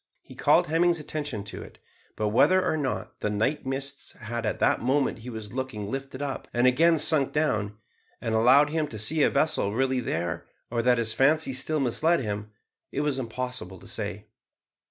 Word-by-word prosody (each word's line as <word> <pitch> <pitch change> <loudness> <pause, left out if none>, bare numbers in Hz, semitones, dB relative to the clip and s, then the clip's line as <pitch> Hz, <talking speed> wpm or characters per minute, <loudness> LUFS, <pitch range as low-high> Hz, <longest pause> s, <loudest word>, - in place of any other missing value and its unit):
He - - -13
called - - +3
Hemming's 170 +2 +2
attention 145 -8 -4
to 100 - -8
it, - - -12 0.4
but 105 -1 -1
whether 185 - +4
or 160 - +1
not 145 -4 -3
the 105 - -1
night 110 +7 -1
mists 140 +1 -4
had 115 -1 -5
at - - -1
the - - +3
moment 130 0 0
he 120 +3 -8
was 110 -2 -8
looking 125 -6 -4
lifted 135 0 -5
up, 140 -1 -4
and 120 +1 +3
again 160 +6 +4
sunk 150 -2 +4
down, 110 -9 0 0.4
and 115 - -3
allowed 130 +6 +5
him 155 -1 0
to 115 - -8
see 140 +10 +2
a - - +5
vessel 140 -8 +1
really 130 +1 +1
there, 85 -8 -3 0.2
or 120 -1 0
that 125 +1 +3
his 115 -1 0
fancy 145 +1 +2
still 150 +4 -1
misled 155 +6 +2
him, 105 -3 -4 0.4
it 140 - -2
was 145 -3 0
impossible 125 -5 -4
to - - -16
say. - - -4
130 Hz, 190 wpm, -26 LUFS, 110-145 Hz, 0.4 s, allowed